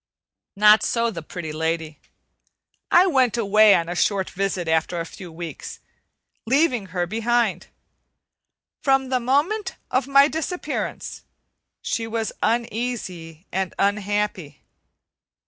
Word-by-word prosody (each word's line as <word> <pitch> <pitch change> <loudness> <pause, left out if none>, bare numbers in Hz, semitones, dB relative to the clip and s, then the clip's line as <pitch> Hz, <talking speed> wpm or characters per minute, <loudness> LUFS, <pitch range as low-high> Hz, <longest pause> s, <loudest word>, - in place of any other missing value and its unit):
Not 210 +1 +6
so, 235 -1 0
the 165 - -6
Pretty 160 0 -7
Lady. 160 -1 -3 0.9
I 355 +2 +6
went 260 - +2
away 215 -1 +5
on 165 - 0
a 175 - -3
short 190 +1 0
visit 190 -2 -2
after 160 +2 0
a 165 - -3
few 175 +1 -10
weeks, 165 0 -8 0.7
leaving 255 -5 +2
her 180 0 -2
behind. 230 +5 0 1.1
From 270 -2 +2
the 255 -1 +1
moment 325 - 0 0.2
of 255 +1 +1
my 275 0 +6
disappearance 320 +5 -4 0.6
she 225 -1 -2
was 225 -1 -2
uneasy 220 -8 -3
and 190 0 -2
unhappy. 200 -6 -1
210 Hz, 115 wpm, -23 LUFS, 175-250 Hz, 1.1 s, Not